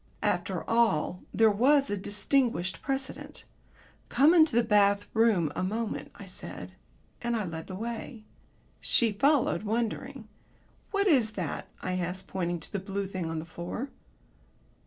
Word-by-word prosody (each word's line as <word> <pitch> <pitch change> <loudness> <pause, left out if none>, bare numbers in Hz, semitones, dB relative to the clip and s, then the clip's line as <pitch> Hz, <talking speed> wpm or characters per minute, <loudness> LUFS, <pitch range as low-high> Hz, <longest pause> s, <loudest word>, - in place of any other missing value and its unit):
After - - -1
all, 205 -7 +2
there 220 +2 +4
was 275 +6 +3
a - - +1
distinguished 205 0 0
precedent. 270 -1 -4 0.6
"Come 285 +7 +5
into 315 -7 +5
the 240 - +5
bath 205 -2 +3
room 220 -9 +3
a - - -2
moment," 220 +4 -3
I - - -10
said, - - -6 0.5
and 235 0 -1
I 215 -3 -1
led 160 -2 -6
the 185 - -6
way. 230 +1 -6 0.6
She 230 -2 +3
followed, 275 +7 +2
wondering. 220 +2 -3 0.6
"What 400 -1 +1
is 255 - +4
that?" 180 -7 -4 0.2
I 185 0 -1
asked, 180 +2 -4
pointing 175 -2 -2
to 200 - -5
a - - -2
blue 195 +1 -3
thing 185 -3 -4
on 165 - -3
the 155 - -4
floor. 175 - -6
210 Hz, 150 wpm, -29 LUFS, 185-240 Hz, 0.6 s, Come